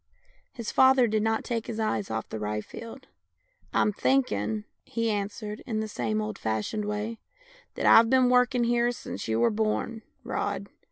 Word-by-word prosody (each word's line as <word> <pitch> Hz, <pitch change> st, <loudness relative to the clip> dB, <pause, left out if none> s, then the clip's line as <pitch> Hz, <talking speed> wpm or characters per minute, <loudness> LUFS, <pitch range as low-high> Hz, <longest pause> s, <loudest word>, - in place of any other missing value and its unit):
His 230 Hz, -3 st, -5 dB
father 260 Hz, -1 st, +6 dB
did 215 Hz, -1 st, +1 dB
not 225 Hz, +1 st, 0 dB
take 230 Hz, -2 st, -3 dB
his 225 Hz, -1 st, -4 dB
eyes 115 Hz, -, -1 dB
off 110 Hz, 0 st, -3 dB
the 110 Hz, -, -5 dB
rye 105 Hz, 0 st, -2 dB
field. 230 Hz, -, -10 dB, 0.7 s
"I'm 210 Hz, -, +2 dB
thinking," 110 Hz, -, +1 dB, 0.2 s
he 230 Hz, -1 st, -1 dB
answered, 210 Hz, +1 st, -4 dB
in 220 Hz, -3 st, -1 dB
the 220 Hz, -, -2 dB
same 115 Hz, -, -2 dB
old 105 Hz, 0 st, -5 dB
fashioned 110 Hz, -, -2 dB
way, 210 Hz, +2 st, -3 dB, 0.3 s
" -, -, -27 dB
that -, -, -2 dB
I've 225 Hz, 0 st, +7 dB
been 260 Hz, 0 st, +5 dB
working 250 Hz, 0 st, +3 dB
here 240 Hz, 0 st, +2 dB
since 205 Hz, -, -6 dB
you 110 Hz, 0 st, 0 dB
were 120 Hz, -, +4 dB
born. 220 Hz, +1 st, -1 dB, 0.2 s
Rod. -, -, -3 dB
220 Hz, 175 wpm, -27 LUFS, -, 0.7 s, I've